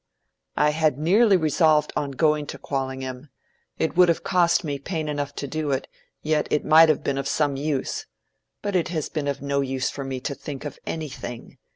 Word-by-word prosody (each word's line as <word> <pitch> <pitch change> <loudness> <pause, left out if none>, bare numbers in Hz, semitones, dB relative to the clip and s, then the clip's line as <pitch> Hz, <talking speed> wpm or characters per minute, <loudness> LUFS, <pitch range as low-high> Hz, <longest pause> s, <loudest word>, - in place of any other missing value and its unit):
"I 150 0 +4
had 155 -3 +1
nearly 195 +7 +4
resolved 155 -1 +3
on 145 - -1
going 150 +2 +1
to - - -6
Quallingham. 130 0 -4 0.5
It 160 - -1
would 180 0 +6
have 170 - +1
cost 175 -3 +3
me 145 -3 -3
pain 160 +1 -3
enough 145 -1 -3
to 140 - -4
do 155 +1 -3
it, 135 -1 -1 0.4
yet 155 0 +1
it 150 - 0
might 160 +1 +7
have 155 - +2
been 135 -1 -1
of 135 - -3
some 145 -3 +1
use. 140 -1 -2 0.6
But 205 -2 -2
it 175 - +2
has 160 -3 -3
been 150 -3 -3
of 140 -1 -3
no 140 0 0
use 130 -1 -1
for 140 - -6
me 135 -1 -4
to 140 - -3
think 140 0 -7
of 145 - -6
anything. 135 -6 -6
150 Hz, 200 wpm, -24 LUFS, 140-160 Hz, 0.6 s, might